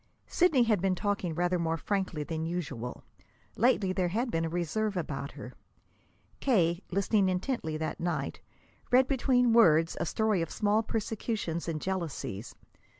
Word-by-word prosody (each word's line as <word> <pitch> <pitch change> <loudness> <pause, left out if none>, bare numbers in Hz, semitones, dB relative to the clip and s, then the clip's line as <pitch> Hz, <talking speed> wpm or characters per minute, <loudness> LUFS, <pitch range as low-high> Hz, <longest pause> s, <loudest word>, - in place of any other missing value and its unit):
Sidney 320 -8 +3
had 215 -5 +2
been 190 -1 +2
talking 200 -4 -1
rather 175 +1 +1
more 165 -1 0
frankly 185 -3 -2
than 160 +1 -4
usual. 150 -8 -4 0.5
Lately 210 -5 +2
there 185 -2 +1
had 230 +7 -1
been 165 0 0
a - - -2
reserve 180 +5 -1
about 140 -4 -4
her. - - -9 0.9
K., 175 -9 +2
listening 200 +1 +2
intently 180 - -2
that 155 0 -3
night, 175 0 -2 0.5
read 255 +1 +5
between 250 -3 +3
words 165 -8 +5
a - - -1
story 215 -2 +1
of 165 - -2
small 210 +1 +1
persecutions 215 -6 -3
and 160 -2 -2
jealousies. 160 - -4
185 Hz, 150 wpm, -30 LUFS, 165-220 Hz, 0.9 s, read